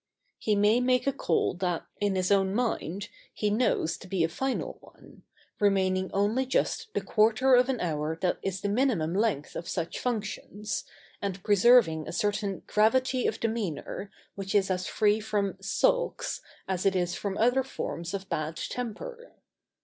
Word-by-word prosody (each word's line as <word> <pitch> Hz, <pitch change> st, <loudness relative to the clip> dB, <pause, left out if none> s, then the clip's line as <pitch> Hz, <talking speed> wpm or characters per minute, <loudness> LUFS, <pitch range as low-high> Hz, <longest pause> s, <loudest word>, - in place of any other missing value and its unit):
] -, -, -44 dB
He 215 Hz, -, +1 dB
may 210 Hz, +3 st, +4 dB
make 250 Hz, 0 st, +2 dB
a 275 Hz, -, +2 dB
call 275 Hz, -, +1 dB
that, 180 Hz, -2 st, -2 dB
in 205 Hz, -2 st, +1 dB
his 185 Hz, +1 st, 0 dB
own 195 Hz, -1 st, +3 dB
mind, 205 Hz, -5 st, -2 dB, 0.3 s
he 210 Hz, -1 st, 0 dB
knows 210 Hz, -7 st, +1 dB
to -, -, -12 dB
be 185 Hz, -2 st, 0 dB
a 165 Hz, -, +1 dB
final 265 Hz, +10 st, -3 dB
one, -, -, -18 dB, 0.4 s
remaining 190 Hz, -2 st, +2 dB
only 215 Hz, +7 st, +1 dB
just 430 Hz, -, 0 dB
the -, -, +1 dB
quarter 225 Hz, +4 st, +3 dB
of 250 Hz, +1 st, +5 dB
an 255 Hz, -3 st, 0 dB
hour 155 Hz, -2 st, -1 dB
that 180 Hz, 0 st, 0 dB
is 190 Hz, 0 st, -3 dB
the 205 Hz, -, -1 dB
minimum 205 Hz, -, +1 dB
length 200 Hz, -8 st, 0 dB
of 170 Hz, -, -5 dB
such 170 Hz, -2 st, -3 dB
functions, 210 Hz, -3 st, -3 dB, 0.4 s
and 195 Hz, -2 st, -3 dB
preserving 205 Hz, -6 st, +5 dB
a -, -, -4 dB
certain 205 Hz, +1 st, -1 dB
gravity 255 Hz, +4 st, +2 dB
of 220 Hz, -, -2 dB
demeanour 210 Hz, -3 st, -3 dB, 0.2 s
which 195 Hz, 0 st, -4 dB
is 195 Hz, -2 st, +3 dB
as 185 Hz, 0 st, -1 dB
free 210 Hz, 0 st, +2 dB
from 210 Hz, -3 st, -1 dB
"sulks" -, -, 0 dB, 0.3 s
as 185 Hz, -1 st, -1 dB
it 195 Hz, -1 st, +2 dB
is 175 Hz, -1 st, 0 dB
from 200 Hz, 0 st, -3 dB
other 245 Hz, +4 st, +3 dB
forms 170 Hz, -9 st, -4 dB
of 195 Hz, 0 st, -6 dB
bad 155 Hz, +1 st, -2 dB
temper. 355 Hz, -, -6 dB
205 Hz, 170 wpm, -28 LUFS, 185-235 Hz, 0.4 s, of